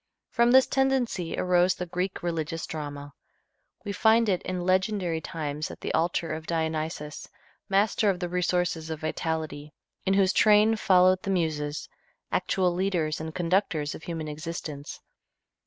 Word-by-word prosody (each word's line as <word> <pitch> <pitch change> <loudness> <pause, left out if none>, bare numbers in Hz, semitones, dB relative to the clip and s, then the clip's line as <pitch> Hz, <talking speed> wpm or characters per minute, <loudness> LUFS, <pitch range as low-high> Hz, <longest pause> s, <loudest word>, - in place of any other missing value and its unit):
From 235 -1 +3
this 260 +1 +7
tendency 265 -10 0
arose 180 0 +3
the 180 - -4
Greek 180 +2 -3
religious 165 -1 -2
drama. 145 -2 -6 0.7
We 205 - -2
find 220 +2 +4
it 185 -2 +1
in 185 -1 -3
legendary 185 -3 +1
times 150 -2 -4
at - - -9
the - - -3
altar 165 0 0
of 155 0 -6
Dionysus, 160 -2 -3 0.4
master 200 +2 +2
of 185 -2 0
the 180 - -2
resources 175 -2 -1
of 160 -1 -4
vitality, 155 -2 -3 0.3
in 195 0 +2
whose 195 -1 +3
train 215 +1 +5
followed 185 -3 +4
the - - -5
Muses, 155 -5 -1 0.4
actual 180 -2 +1
leaders 175 -5 -1
and 160 0 -6
conductors 170 -4 0
of - - -9
human 165 -2 -5
existence. 150 -1 -6
175 Hz, 145 wpm, -27 LUFS, 155-190 Hz, 0.7 s, this